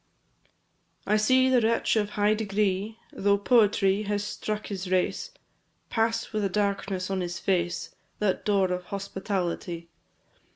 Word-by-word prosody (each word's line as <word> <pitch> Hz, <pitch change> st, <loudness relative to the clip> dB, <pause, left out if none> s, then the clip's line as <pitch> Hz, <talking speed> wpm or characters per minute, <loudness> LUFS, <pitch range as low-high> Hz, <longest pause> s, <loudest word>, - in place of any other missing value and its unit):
I 210 Hz, -, +2 dB
see 255 Hz, +5 st, +4 dB
the 255 Hz, -2 st, +4 dB
wretch 230 Hz, +1 st, +2 dB
of 210 Hz, -2 st, +1 dB
high 205 Hz, +1 st, +4 dB
degree, 210 Hz, 0 st, -1 dB, 0.2 s
Though 200 Hz, 0 st, +2 dB
poverty 205 Hz, -3 st, +3 dB
has 205 Hz, -1 st, -1 dB
struck 210 Hz, 0 st, -4 dB
his 190 Hz, -2 st, -5 dB
race, 185 Hz, -, 0 dB, 0.6 s
Pass 225 Hz, 0 st, 0 dB
with 215 Hz, -1 st, 0 dB
a 195 Hz, -, +1 dB
darkness 195 Hz, -1 st, -1 dB
on 190 Hz, -1 st, 0 dB
his 175 Hz, -1 st, -3 dB
face 175 Hz, -2 st, -1 dB, 0.2 s
That 205 Hz, -3 st, 0 dB
door 195 Hz, -3 st, +2 dB
of 180 Hz, 0 st, -3 dB
hospitality. 190 Hz, -3 st, -3 dB
200 Hz, 135 wpm, -27 LUFS, 190-215 Hz, 0.6 s, see